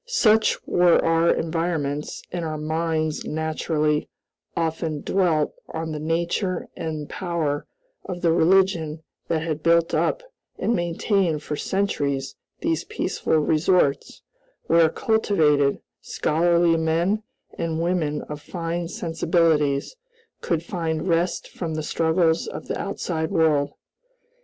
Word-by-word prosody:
Such 220 - +3
were 175 -1 +4
our 165 +1 +3
environments, 160 -3 -2
and 175 -1 -3
our 155 -1 -3
minds 155 0 -1
naturally 155 -1 -1 0.5
often 160 -2 -1
dwelt 170 -6 +1 0.2
on 160 0 -4
the 150 - -4
nature 170 +4 -1
and 155 -2 -4
power 165 -6 -2 0.4
of 180 -2 -6
the 170 - +4
religion 165 -2 +2 0.2
that 160 -1 0
had 155 -2 -3
built 170 +1 +3
up - - +1 0.3
and 235 - 0
maintained 175 -2 0
for 150 - -3
centuries 140 -8 -1 0.3
these 165 -1 0
peaceful 160 - -1
resorts, 155 -1 +1 0.4
where 165 -1 +5
cultivated, 155 -10 +2 0.2
scholarly 170 +1 +2
men, 165 +6 +1 0.4
and 165 -1 -1
women 165 -3 0
of 150 0 -7
fine 170 0 -3
sensibilities, 165 - +1 0.4
could 165 -1 -1
find 165 -1 -2
rest 170 0 0
from 165 -3 -5
the 155 - -2
struggles 160 +1 +1
of 150 - -7
the - - -3
outside 160 -5 -2
world. 150 -3 +2
165 Hz, 120 wpm, -24 LUFS, 155-175 Hz, 0.5 s, where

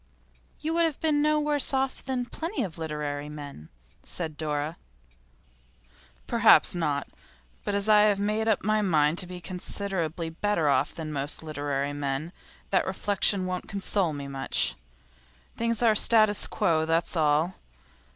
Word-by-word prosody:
'You 315 +2 -2
would 335 0 +3
have 315 -4 -2
been 300 -2 +2
no 305 0 +3
worse 295 -2 +1
off 265 0 -1
than 255 -2 -2
plenty 330 - -4
of 175 -4 -6
literary 150 -2 -4
men,' 145 - -9 0.3
said 160 -3 -4
Dora. 150 +1 -3 1.5
'Perhaps - - +5
not. 150 -5 -1 0.6
But - - -2
as 200 +1 0
I 210 -1 +6
have 205 -2 +2
made 215 +2 0
up 220 - +1
my 215 +1 +2
mind 155 -4 +2
to 180 - +1
be 180 0 -7
considerably 175 -2 -3
better 170 -2 0
off 140 0 +1
than 155 -2 -5
most 145 +3 -2
literary 145 -2 -3
men 145 +3 -3 0.4
that 190 - +2
reflection 195 0 +2
wouldn't 185 0 -4
console 195 -3 0
me 140 -2 -6
much. 135 -1 0 0.8
Things 230 0 -1
are 230 - +6
in - - +1
statu 215 -1 +4
quo, 160 -1 +1
that's 165 +2 +1
all. 155 +2 +2
175 Hz, 150 wpm, -27 LUFS, 150-215 Hz, 1.5 s, I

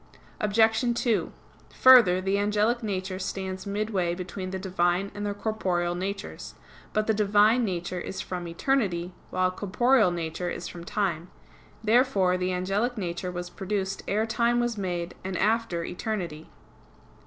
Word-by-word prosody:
Obj. 220 +2 +3 0.2
2: 235 -4 +1 0.4
Further, 235 -9 +7
the 195 +2 0
angelic 210 +4 +1
nature 190 -3 -3
stands 190 0 -4
midway 200 -4 -1
between 185 +1 -5
the 190 - -3
Divine 185 0 0
and 205 0 -4
the 205 - -2
corporeal 185 -5 -1
natures. 195 +3 -5 0.4
But 215 0 +1
the 220 - +2
Divine 210 +3 +4
nature 180 -3 -2
is 190 - -6
from 180 -1 -4
eternity; 180 -2 0 0.2
while 185 0 +1
corporeal 215 +4 +3
nature 170 0 -3
is 175 - -5
from 170 -1 -9
time. 180 -4 -2 0.5
Therefore 215 -5 +3
the 185 0 -1
angelic 195 +7 -1
nature 180 -1 -3
was 175 0 -6
produced 195 -1 -3
ere 215 +3 +1
time 235 +1 +1
was 240 -1 0
made, 175 -4 -3
and 190 -1 -3
after 220 -6 +1
eternity. 175 -5 -4
195 Hz, 140 wpm, -27 LUFS, 180-215 Hz, 0.5 s, Further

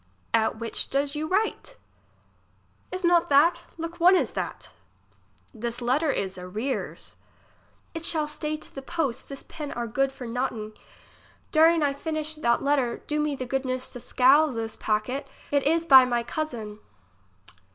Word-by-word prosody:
At 220 0 +2
which 230 -1 -1
does 280 +1 0
you 305 +1 -3
write? 435 +6 -1 1.1
Is 370 +1 -5
not 345 -1 +4
that? 295 +5 +4
look 330 +1 -6
one 360 +3 +7
is - - +1
that. - - -5 0.8
Tliis 235 +2 -4
letter 260 +6 +1
is 190 -8 -2
arrears. 210 +9 -4 0.8
It 325 -1 -5
shall 315 -2 0
stay 300 0 -3
to - - -10
the 270 - -6
post. 270 -4 -3
This 275 -1 -7
pen 300 -3 -7
are 240 - -3
good 270 +4 0
for 265 -2 -9
notting. 230 -3 -3 0.8
During 325 0 +5
I 285 -1 +2
finish 310 +1 -3
that 235 -6 +1
letter, 275 -4 +1
do 300 0 -1
me 300 -1 0
the 255 - -5
goodness 255 0 -2
to 245 - -6
seal 265 +5 +4
this 225 -2 -4
packet; 220 +6 -1 0.2
it 285 -1 +3
is 330 +2 +2
by 265 -5 +9
my 240 -1 0
cousin. 235 -6 -5
275 Hz, 155 wpm, -26 LUFS, 240-310 Hz, 1.1 s, by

